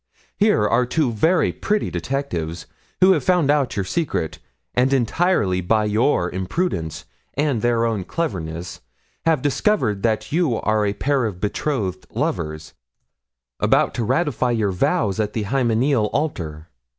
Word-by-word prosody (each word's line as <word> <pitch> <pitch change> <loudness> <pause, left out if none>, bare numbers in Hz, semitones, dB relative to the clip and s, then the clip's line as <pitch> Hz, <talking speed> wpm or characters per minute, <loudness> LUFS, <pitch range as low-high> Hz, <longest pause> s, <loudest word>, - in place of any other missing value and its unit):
Here 205 - +3
are 125 +2 +2
two 145 -1 +1
very 160 - +2
pretty 210 +1 -1
detectives 90 - -3 0.4
who 185 +1 +7
have 155 -8 +2
found 175 -4 +3
out 145 -4 +1
your 100 -2 -1
secret, 145 - -2 0.3
and 125 +2 +2
entirely 125 - +1
by 105 +4 +2
your 105 -2 +2
imprudence 95 - -2 0.3
and 140 -5 0
their 115 0 +2
own 110 -5 -1
cleverness 85 - -4 0.5
have 160 -5 +2
discovered 145 - +1
that 110 -1 0
you 160 -6 +2
are 110 -1 +1
a 100 - 0
pair 135 +2 0
of 100 -5 -4
betrothed 105 -1 -2
lovers, 80 0 -3 0.9
about - - +3
to 120 - -2
ratify 130 0 +1
your 110 -4 +1
vows 95 +2 0
at 105 -1 -1
the 110 - -1
hymeneal 120 +1 +1
altar. 85 - -3
115 Hz, 140 wpm, -21 LUFS, 100-145 Hz, 0.9 s, who